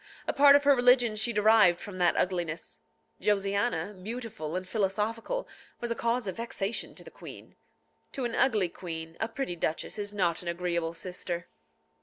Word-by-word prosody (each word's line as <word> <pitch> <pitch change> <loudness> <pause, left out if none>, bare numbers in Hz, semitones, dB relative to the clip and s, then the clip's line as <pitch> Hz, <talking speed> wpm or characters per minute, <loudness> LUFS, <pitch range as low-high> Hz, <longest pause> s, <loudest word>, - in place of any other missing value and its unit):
A - - 0
part 280 0 +7
of 285 - +4
her 285 -1 +6
religion 245 -2 +4
she 220 +3 0
derived 210 -4 +5
from 185 -3 -8
that 175 -1 +3
ugliness. 165 - -2 0.4
Josiana, 200 -2 0
beautiful 220 -8 -5
and 185 0 -3
philosophical, 220 - -1 0.3
was 240 -1 -3
a - - 0
cause 235 +1 0
of 190 - -4
vexation 230 -2 -3
to - - -10
the - - -12
queen. - - -12 0.6
To 265 -4 -2
an 235 - -2
ugly 215 -8 +2
queen, 165 -2 -7
a 220 - 0
pretty 230 -5 -4
duchess 165 +4 -3
is 205 0 -4
not 180 -5 0
an 175 - -10
agreeable 170 -1 -2
sister. 175 0 -5
205 Hz, 170 wpm, -29 LUFS, 175-230 Hz, 0.6 s, part